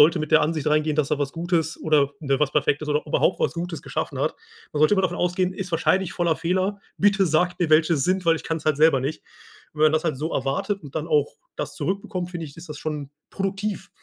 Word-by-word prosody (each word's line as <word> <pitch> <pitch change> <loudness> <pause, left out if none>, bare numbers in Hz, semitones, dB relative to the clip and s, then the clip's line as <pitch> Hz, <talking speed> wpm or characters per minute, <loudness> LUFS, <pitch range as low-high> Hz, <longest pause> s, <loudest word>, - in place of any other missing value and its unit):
sollte 160 +4 +6
mit 155 -1 -4
der - - +6
Ansicht 155 -1 -1
reingehen, 155 0 +2
dass 150 -3 +1
er 150 - +1
was 145 -1 -2
Gutes 165 -1 -1
oder, 150 -3 +3
ne, 140 -3 0
was 150 -2 +2
Perfektes 150 0 +1
oder 150 0 +1
überhaupt - - +2
was - - +1
Gutes 170 0 -5
geschaffen - - -4
hat. - - 0 0.4
Man 150 - -2
sollte 155 +7 +5
immer 190 - +1
davon 180 -1 0
ausgehen: 180 +1 0
„Ist 185 0 -6
wahrscheinlich 180 +2 +1
voller 170 -3 +1
Fehler. 185 +4 -1 0.2
Bitte 195 -1 +4
sagt 175 +3 +1
mir, 170 -3 +1
welche 155 +2 +5
es 140 -4 0
sind, 185 0 +1
weil 165 -1 +4
ich - - -9
kann's 160 -1 -3
halt 155 -2 +2
selber 155 -3 +5
nicht.“ 140 +4 -3 0.5
Und 150 - -15
wenn - - +6
man 155 - +3
das 155 +1 +1
halt 160 -5 0
so 155 +3 -3
erwartet 140 +10 -1
und 145 -2 -11
dann 160 0 -2
auch 150 -3 +1 0.2
das - - -4
zurückbekommt, 190 -2 -3
finde 170 -2 -5
ich, 140 - -13
ist 165 +1 -11
das 150 -1 -7
schon 150 -3 -4 0.2
produktiv. 195 0 -3
160 Hz, 250 wpm, -24 LUFS, 150-180 Hz, 0.5 s, sollte